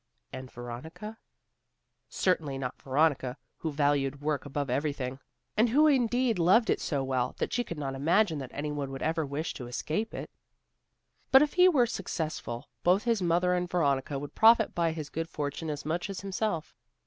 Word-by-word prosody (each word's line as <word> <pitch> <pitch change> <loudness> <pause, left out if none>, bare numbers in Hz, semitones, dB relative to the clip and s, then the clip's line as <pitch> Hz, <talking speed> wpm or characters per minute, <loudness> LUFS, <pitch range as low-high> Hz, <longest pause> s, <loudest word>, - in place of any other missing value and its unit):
And 130 0 -7
Veronica? 145 - -8 0.9
Certainly 155 -7 0
not 130 -2 -5
Veronica, 135 -2 +1 0.2
who 160 - -3
valued 145 -1 +1
work 145 -1 -2
above 145 0 -2
everything, 135 -1 -2 0.4
and 225 +2 +4
who 295 +7 +5
indeed 245 -6 +2
loved 195 +7 +4
it - - 0
so 140 -4 -1
well, 130 -2 -1
that - - -2
she 245 - +1
could 170 - -7
not 140 -2 -3
imagine 165 +4 +2
that 130 -2 -6
any 150 +1 -3
one 140 -2 -3
should 135 - -5
ever 160 -1 0
wish 145 +4 -3
to 125 - -7
escape 160 - -3
it. - - -6 1.0
But 265 +2 +8
if 295 - -1
he 365 0 +6
were 270 -9 +4
successful, 155 - -4
both 185 +4 +3
his 230 -4 +1
mother 175 +1 +2
and 180 0 -1
Veronica 140 -5 +1
would 145 +1 -7
profit 225 0 +5
by 170 -1 +1
his 155 -2 -6
good 165 +1 -3
fortune 150 +1 -4
as 145 -1 -4
much 170 +5 -2
as 195 - -5
himself. 195 -4 -2
155 Hz, 180 wpm, -29 LUFS, 140-195 Hz, 1.0 s, But